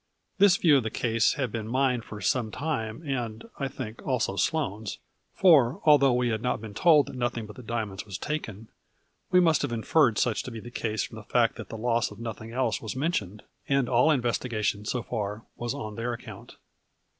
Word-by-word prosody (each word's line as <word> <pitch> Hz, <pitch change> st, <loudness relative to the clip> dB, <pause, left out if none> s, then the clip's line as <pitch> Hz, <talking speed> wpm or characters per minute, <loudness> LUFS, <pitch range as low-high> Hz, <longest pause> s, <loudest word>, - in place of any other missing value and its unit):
This 195 Hz, -2 st, +6 dB
view 155 Hz, -5 st, +5 dB
of -, -, +2 dB
the 110 Hz, -, -2 dB
case 115 Hz, 0 st, +1 dB
had 130 Hz, -5 st, -2 dB
been 110 Hz, -1 st, -4 dB
mine 130 Hz, 0 st, +1 dB
for 110 Hz, -2 st, -9 dB
some 120 Hz, -4 st, +1 dB
time 130 Hz, -1 st, -3 dB
and, 120 Hz, -, -3 dB
I 140 Hz, -, 0 dB
think, 130 Hz, -4 st, -7 dB
also 125 Hz, -7 st, -1 dB
Sloane's, 110 Hz, -, -1 dB, 0.3 s
for, 145 Hz, -10 st, +5 dB
although 145 Hz, -3 st, +6 dB
we 125 Hz, 0 st, +1 dB
had 110 Hz, -1 st, -1 dB
not 125 Hz, -, 0 dB
been 110 Hz, -1 st, -8 dB
told 150 Hz, -, +5 dB
that -, -, -9 dB
nothing 120 Hz, -2 st, -2 dB
but 105 Hz, -, -11 dB
the -, -, -10 dB
dia 115 Hz, -1 st, -2 dB
monds 95 Hz, -1 st, -7 dB
was 100 Hz, -3 st, -6 dB
taken, 115 Hz, -8 st, -5 dB, 0.6 s
we 180 Hz, -, +5 dB
must 165 Hz, -4 st, +4 dB
have -, -, -2 dB
inferred 115 Hz, +1 st, +2 dB
such 120 Hz, -4 st, +1 dB
to -, -, -7 dB
be 115 Hz, -2 st, -7 dB
the 120 Hz, +2 st, -10 dB
case 110 Hz, -4 st, -2 dB
from -, -, -8 dB
the -, -, -9 dB
fact -, -, +2 dB
that -, -, -8 dB
the 115 Hz, -, -6 dB
loss 115 Hz, 0 st, +1 dB
of 105 Hz, -, -12 dB
nothing 115 Hz, 0 st, -6 dB
else 120 Hz, -4 st, 0 dB
was 110 Hz, -, -5 dB
mentioned, 110 Hz, -, -2 dB, 0.3 s
and 135 Hz, -2 st, +2 dB
all 125 Hz, +4 st, +4 dB
investiga 120 Hz, -5 st, 0 dB
tion, 105 Hz, 0 st, 0 dB
so 120 Hz, +2 st, -2 dB
far, 105 Hz, -1 st, -4 dB
was 120 Hz, +2 st, -3 dB
on 110 Hz, -7 st, -5 dB
their 115 Hz, +3 st, -3 dB
account. 115 Hz, -, -10 dB
120 Hz, 215 wpm, -27 LUFS, 110-135 Hz, 0.6 s, This